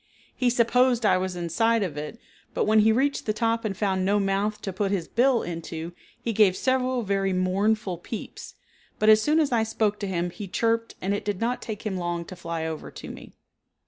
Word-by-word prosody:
He 250 Hz, -, +2 dB
supposed 245 Hz, 0 st, +3 dB
I 185 Hz, -, +4 dB
was 185 Hz, -1 st, -3 dB
inside 205 Hz, +7 st, +1 dB
of 170 Hz, -7 st, -4 dB
it, 150 Hz, +9 st, -6 dB, 0.4 s
but -, -, +1 dB
when 215 Hz, +1 st, +4 dB
he 220 Hz, +1 st, +5 dB
reached 270 Hz, +4 st, 0 dB
the 215 Hz, -, +2 dB
top 230 Hz, +1 st, 0 dB
and 200 Hz, -4 st, -3 dB
found 190 Hz, -3 st, 0 dB
no 200 Hz, +2 st, +2 dB
mouth 200 Hz, +2 st, 0 dB
to 195 Hz, -, -3 dB
put 195 Hz, +2 st, -1 dB
his 185 Hz, -5 st, -1 dB
bill 245 Hz, 0 st, +2 dB
into, 165 Hz, -1 st, -5 dB, 0.3 s
he 230 Hz, -, -3 dB
gave 200 Hz, -3 st, +4 dB
several 255 Hz, -1 st, +1 dB
very 195 Hz, -1 st, 0 dB
mournful 190 Hz, +1 st, 0 dB
peeps, 215 Hz, +5 st, -8 dB, 0.4 s
but 215 Hz, -, +3 dB
as 215 Hz, 0 st, +7 dB
soon 300 Hz, +6 st, +3 dB
as 300 Hz, -4 st, +1 dB
I 235 Hz, -2 st, +3 dB
spoke 220 Hz, -1 st, 0 dB
to 200 Hz, -, -3 dB
him 175 Hz, -2 st, -2 dB
he 205 Hz, +2 st, -7 dB
chirped 230 Hz, +4 st, 0 dB
and 195 Hz, +2 st, 0 dB
it 205 Hz, -, -2 dB
did 205 Hz, -3 st, -2 dB
not 240 Hz, +2 st, -1 dB
take 220 Hz, 0 st, -6 dB
him 195 Hz, -3 st, -2 dB
long 175 Hz, -1 st, -3 dB
to 185 Hz, -, -9 dB
fly 170 Hz, -2 st, -4 dB
over 160 Hz, -1 st, -5 dB
to -, -, -9 dB
me. -, -, -12 dB
205 Hz, 215 wpm, -26 LUFS, 185-230 Hz, 0.4 s, as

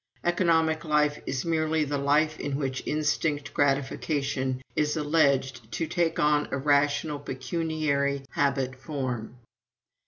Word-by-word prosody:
Economic 165 Hz, -2 st, +2 dB
life 150 Hz, -2 st, +1 dB
is 130 Hz, +2 st, -2 dB
merely 160 Hz, -1 st, +1 dB
the 145 Hz, -1 st, -2 dB
life 150 Hz, +3 st, +2 dB
in 140 Hz, -1 st, -2 dB
which 135 Hz, -2 st, -2 dB
instinct 150 Hz, -1 st, 0 dB
gratification 135 Hz, -1 st, 0 dB, 0.2 s
is 150 Hz, +1 st, +1 dB
alleged 140 Hz, -6 st, +1 dB
to 165 Hz, -, -1 dB
take 165 Hz, 0 st, 0 dB
on 150 Hz, 0 st, +3 dB
a -, -, -2 dB
rational 145 Hz, +1 st, +1 dB
pecuniary 140 Hz, 0 st, -1 dB
habit 135 Hz, -2 st, 0 dB
form. 130 Hz, -4 st, -4 dB
145 Hz, 120 wpm, -27 LUFS, 135-155 Hz, 0.2 s, on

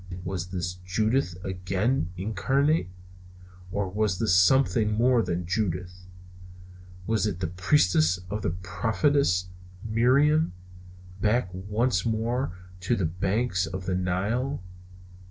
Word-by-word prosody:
Was 90 Hz, -2 st, -4 dB
this 90 Hz, 0 st, -4 dB
Judith 110 Hz, +1 st, 0 dB
again 95 Hz, +3 st, -1 dB
incarnate? 135 Hz, -, +1 dB, 0.8 s
Or 100 Hz, 0 st, -1 dB
was 100 Hz, 0 st, 0 dB
this 105 Hz, -2 st, +1 dB
something 105 Hz, +2 st, +4 dB
more 120 Hz, +2 st, +3 dB
than 90 Hz, -3 st, -2 dB
Judith? 90 Hz, -1 st, -3 dB, 1.0 s
Was 110 Hz, +1 st, +1 dB
it 95 Hz, -4 st, -3 dB
the 90 Hz, -, -1 dB
Priestess 90 Hz, -, +2 dB
and 105 Hz, +1 st, -2 dB
the -, -, 0 dB
Prophetess 95 Hz, -, 0 dB, 0.4 s
Miriam, 130 Hz, -, +3 dB, 0.7 s
back 110 Hz, -1 st, +2 dB
once 100 Hz, +2 st, 0 dB
more 115 Hz, -2 st, -1 dB, 0.2 s
to 95 Hz, +7 st, 0 dB
the 95 Hz, -, -1 dB
banks 95 Hz, +4 st, 0 dB
of 95 Hz, 0 st, -6 dB
the 95 Hz, -, -1 dB
Nile? 95 Hz, +8 st, -1 dB
100 Hz, 115 wpm, -26 LUFS, 90-115 Hz, 1.0 s, something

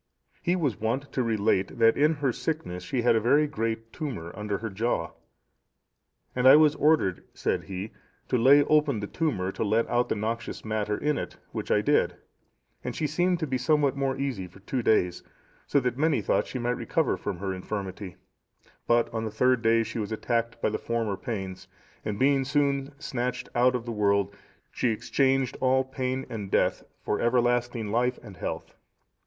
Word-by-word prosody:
He 175 Hz, -, +1 dB
was 145 Hz, -, -1 dB
wont 125 Hz, +6 st, -2 dB
to 130 Hz, -, 0 dB
relate 110 Hz, -4 st, +1 dB
that 115 Hz, -1 st, +5 dB
in 150 Hz, +3 st, +3 dB
her 140 Hz, -4 st, 0 dB
sickness 150 Hz, -, -3 dB
she 120 Hz, +6 st, -2 dB
had 120 Hz, -, +4 dB
a -, -, +4 dB
very 145 Hz, +7 st, +4 dB
great 115 Hz, -4 st, -3 dB
tumour 110 Hz, -, -5 dB
under 105 Hz, 0 st, -2 dB
her 115 Hz, 0 st, -5 dB
jaw. 95 Hz, -5 st, -1 dB, 1.2 s
"And 125 Hz, 0 st, +3 dB
I 135 Hz, -, +10 dB
was 150 Hz, -1 st, +6 dB
ordered," 150 Hz, -, +2 dB
said -, -, -1 dB
he, 95 Hz, +2 st, -5 dB, 0.4 s
"to -, -, 0 dB
lay 135 Hz, +4 st, +6 dB
open 150 Hz, -5 st, +2 dB
that 100 Hz, -, -7 dB
tumour 95 Hz, -, 0 dB
to -, -, -3 dB
let 110 Hz, +2 st, +2 dB
out 120 Hz, 0 st, +2 dB
the -, -, +1 dB
noxious 110 Hz, +3 st, -4 dB
matter 105 Hz, -1 st, -1 dB
in 150 Hz, 0 st, 0 dB
it, -, -, -6 dB
which -, -, -5 dB
I -, -, +3 dB
did, -, -, +2 dB, 0.7 s
and -, -, -4 dB
she 155 Hz, -, -1 dB
seemed 175 Hz, +4 st, +1 dB
to -, -, +1 dB
be 130 Hz, -3 st, -2 dB
somewhat 145 Hz, 0 st, +2 dB
more 135 Hz, -1 st, -1 dB
easy 130 Hz, -9 st, -3 dB
for 90 Hz, +2 st, -17 dB
two 125 Hz, +5 st, -2 dB
days, 90 Hz, -6 st, +2 dB, 0.5 s
so 140 Hz, -, +3 dB
that 125 Hz, 0 st, -2 dB
many 155 Hz, -4 st, +3 dB
thought -, -, +1 dB
she -, -, -5 dB
might 120 Hz, 0 st, -1 dB
recover 125 Hz, -, 0 dB
from -, -, -4 dB
her 95 Hz, +1 st, -3 dB
infirmity; 95 Hz, 0 st, -5 dB, 0.7 s
but 120 Hz, 0 st, +3 dB
on 110 Hz, -1 st, -2 dB
the 110 Hz, -, -2 dB
third 125 Hz, +3 st, +2 dB
day 115 Hz, 0 st, +3 dB
she 115 Hz, -, -5 dB
was 105 Hz, 0 st, -3 dB
attacked 115 Hz, +1 st, -1 dB
by -, -, +3 dB
the 110 Hz, -, -3 dB
former 115 Hz, -3 st, -1 dB
pains, 95 Hz, -5 st, -5 dB, 0.4 s
and 105 Hz, -1 st, -3 dB
being 135 Hz, +2 st, +3 dB
soon 140 Hz, 0 st, 0 dB
snatched 125 Hz, -3 st, -3 dB
out 125 Hz, +1 st, +3 dB
of 120 Hz, -2 st, -3 dB
the 120 Hz, -, -4 dB
world, 100 Hz, -2 st, +1 dB, 0.4 s
she 125 Hz, -, 0 dB
exchanged 130 Hz, +3 st, +1 dB
all 130 Hz, 0 st, +3 dB
pain 130 Hz, 0 st, -3 dB
and 105 Hz, -4 st, -6 dB
death -, -, +2 dB, 0.2 s
for 105 Hz, -, -1 dB
everlasting 120 Hz, -2 st, +1 dB
life 125 Hz, +2 st, +1 dB
and 100 Hz, -5 st, -11 dB
health. -, -, -5 dB
120 Hz, 190 wpm, -27 LUFS, 105-135 Hz, 1.2 s, I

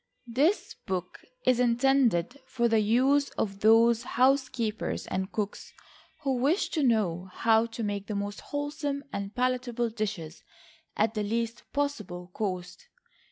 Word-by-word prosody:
This 280 Hz, -, +1 dB
book 185 Hz, -1 st, -3 dB, 0.3 s
is 255 Hz, -1 st, +4 dB
intended 245 Hz, -3 st, +2 dB
for 235 Hz, -2 st, +1 dB
the 225 Hz, -1 st, +3 dB
use 260 Hz, +7 st, +3 dB
of 195 Hz, -2 st, -2 dB
those 225 Hz, +2 st, +5 dB
housekeepers 255 Hz, -3 st, 0 dB
and 190 Hz, +1 st, -3 dB
cooks 210 Hz, -2 st, -4 dB, 0.5 s
who 270 Hz, -3 st, +1 dB
wish 290 Hz, +10 st, +1 dB
to 315 Hz, -, -1 dB
know 195 Hz, -8 st, +1 dB
how 225 Hz, +3 st, +3 dB
to 230 Hz, 0 st, -6 dB
make 205 Hz, -1 st, -3 dB
the 210 Hz, -, -3 dB
most 205 Hz, 0 st, -4 dB
wholesome 290 Hz, -1 st, -3 dB
and 200 Hz, +1 st, -4 dB
palatable 245 Hz, -2 st, 0 dB
dishes 205 Hz, -7 st, -4 dB, 0.5 s
at 215 Hz, +1 st, +2 dB
the 215 Hz, -, -1 dB
least 230 Hz, +2 st, -2 dB
possible 210 Hz, -12 st, -3 dB
cost. 185 Hz, -, -4 dB
230 Hz, 135 wpm, -28 LUFS, 205-255 Hz, 0.5 s, those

